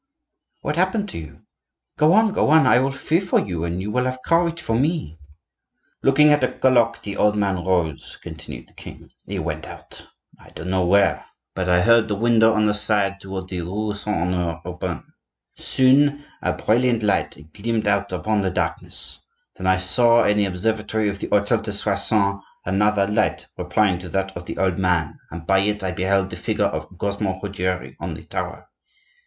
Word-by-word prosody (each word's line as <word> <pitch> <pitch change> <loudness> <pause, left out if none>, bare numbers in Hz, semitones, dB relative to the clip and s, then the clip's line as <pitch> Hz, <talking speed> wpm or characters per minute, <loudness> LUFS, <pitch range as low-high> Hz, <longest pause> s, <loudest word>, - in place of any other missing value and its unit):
"I." 295 +3 -56
"What 150 - -1
happened 195 +3 +1
to - - -6
you? 80 - -11 0.6
Go 155 +3 +5
on, 220 0 +4
go - - +2
on; 155 -2 +6
I 125 -1 +5
will 135 +2 +1
fear 160 +5 0
for 185 - +2
you, 85 -4 -3
and 85 +1 -3
you 105 - -4
will 125 +3 0
have 130 0 -3
courage 170 0 +2
for 115 - -3
me." 130 - -1 0.8
"Looking 150 +3 +5
at 145 -2 +3
a 130 - +2
clock, 120 -3 +2
the 100 -1 -5
old 105 0 +3
man 100 -4 0
rose," 85 -5 -1
continued - - -9
the - - -24
king. - - -12 0.2
"He - - -4
went - - -4
out, - - -11 0.3
I - - -17
don't 90 +3 -5
know 95 -2 +1
where; 100 +2 +3 0.3
but 95 -1 -2
I 90 0 +4
heard 115 0 +5
the 105 - -1
window 115 +1 +4
on 110 0 +2
the 105 - +2
side 100 -2 0
toward 95 -1 -6
the 90 -2 -3
rue 105 +5 -3
Saint 105 -1 -3 0.2
Honore 85 -2 -2
open. 90 0 -5 0.6
Soon 145 +3 +3 0.2
a - - 0
brilliant 120 0 +1
light 105 - +1 0.2
gleamed 110 0 -2
out 100 -1 +1
upon 105 +3 0
the 95 - 0
darkness; - - -2 0.4
then - - -4
I 95 0 +4
saw 115 +5 +4
in 105 - +2
the 105 - +3
observatory 105 +3 -1
of 100 0 -5
the - - -4
hotel 105 +3 +2
de 110 -1 -4
Soissons 100 0 +1 0.2
another 100 +1 +2
light 105 +2 0
replying 95 -5 +1
to 90 -1 -8
that 95 +2 -2
of 85 0 -8
the - - -6
old 95 -1 0
man, 90 -5 0
and 85 0 -8
by 95 +2 +3
it 105 +1 0
I 95 - -1
beheld 95 +2 0
the - - -6
figure - - -1
of - - -3
Cosmo 100 -1 -2
Ruggiero 95 -2 -3
on - - -5
the - - -11
tower. - - -5
105 Hz, 195 wpm, -22 LUFS, 95-120 Hz, 0.8 s, on